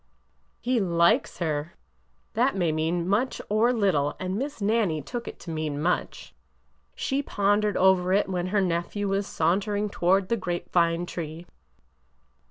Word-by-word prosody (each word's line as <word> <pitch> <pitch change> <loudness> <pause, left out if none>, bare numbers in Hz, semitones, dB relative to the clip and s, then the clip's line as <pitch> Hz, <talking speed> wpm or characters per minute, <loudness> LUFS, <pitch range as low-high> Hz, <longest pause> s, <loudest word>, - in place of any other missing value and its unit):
He 250 -1 +1
likes 170 -3 +2
her! 155 -2 -2 0.6
It - - +2
may 175 -4 +1
mean 165 +2 -1
much 215 +7 0
or 220 +4 +3
little, 190 - +1
and 185 0 -3
Miss 275 +5 -4
Nannie 200 -8 +1
took 240 - -6
it - - -7
to 170 - -7
mean 155 -2 -3
much. 175 +4 -2 0.6
She 275 0 -1
pondered 205 -4 +1
over 185 -1 +4
it 200 +2 +3
when 180 -2 -2
her 205 +2 +1
nephew 180 +3 -1
was 195 +1 0
sauntering 205 +5 0
toward 190 +1 +2
the 235 - +1
grape 175 -3 -4
vine 170 0 +2
tree. 165 -1 -6
185 Hz, 150 wpm, -26 LUFS, 170-205 Hz, 0.6 s, over